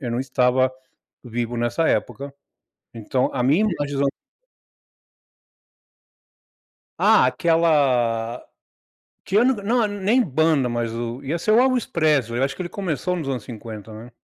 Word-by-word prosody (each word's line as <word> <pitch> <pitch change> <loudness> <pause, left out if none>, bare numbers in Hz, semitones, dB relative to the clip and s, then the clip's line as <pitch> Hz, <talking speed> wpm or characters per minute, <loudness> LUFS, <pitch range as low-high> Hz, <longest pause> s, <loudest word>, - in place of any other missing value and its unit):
eu 125 -4 -4
não 120 - -2
estava 130 0 +1 0.5
vivo 120 0 -4
nessa 120 +7 0
época. 140 0 -2 0.6
Então, 115 +3 -1
a 130 - -1
minha 145 - +3
imagem 145 -8 -2
dos 140 - 0
anos 140 - +2 2.9
Ah, - - +5
aquela 130 -9 +1 0.8
que 195 - -1
eu 235 - +5
não 235 -1 +1
é - - 0
nem 205 +5 +1
banda, 155 - +1
mas 120 -1 -2
o 120 +2 -5
ia 150 +5 -2
ser 215 +6 0
o 225 - +5
Elvis 255 -2 +2
Presley, 145 -8 +1
eu 135 - +3
acho 135 - -2
que - - -4
ele 175 - -5
começou 180 -1 -3
nos 155 -5 -4
anos 125 -6 -3
50, 110 -2 -9
né. 115 +3 -11
135 Hz, 150 wpm, -22 LUFS, 120-170 Hz, 2.9 s, Ah